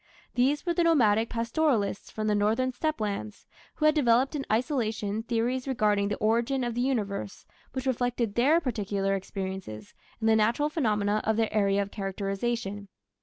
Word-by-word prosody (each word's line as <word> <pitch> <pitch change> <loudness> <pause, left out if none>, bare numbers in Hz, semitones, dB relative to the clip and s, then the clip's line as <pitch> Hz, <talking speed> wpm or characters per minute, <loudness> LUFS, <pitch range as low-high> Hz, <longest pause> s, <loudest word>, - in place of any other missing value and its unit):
These 270 +6 +1
were 345 - +1
the 345 - +2
nomadic 230 -9 +3
pastoralists 230 -3 0
from 215 - -4
the 210 - +2
northern 220 +5 +1
steppe 310 +3 -2
lands, 210 0 -4 0.3
who 305 - -1
had 305 - +6
developed 260 -1 +3
in 275 -2 -4
isolation 220 -4 0
theories 240 +3 -1
regarding 210 -6 +1
the 205 - -2
origin 235 +4 +1
of 240 -1 -2
the 240 - -1
Universe 205 -7 -2 0.3
which 260 0 -4
reflected 245 -4 0
their 280 +9 +4
particular 205 - -1
experiences 190 - -6 0.3
and 225 - 0
the 220 - +5
natural 230 +7 +2
phenomena 210 -8 0
of 220 0 +1
their 225 -1 0
area 200 -1 +2
of 200 - -10
characterization. 200 +1 -3
225 Hz, 165 wpm, -28 LUFS, 205-255 Hz, 0.3 s, had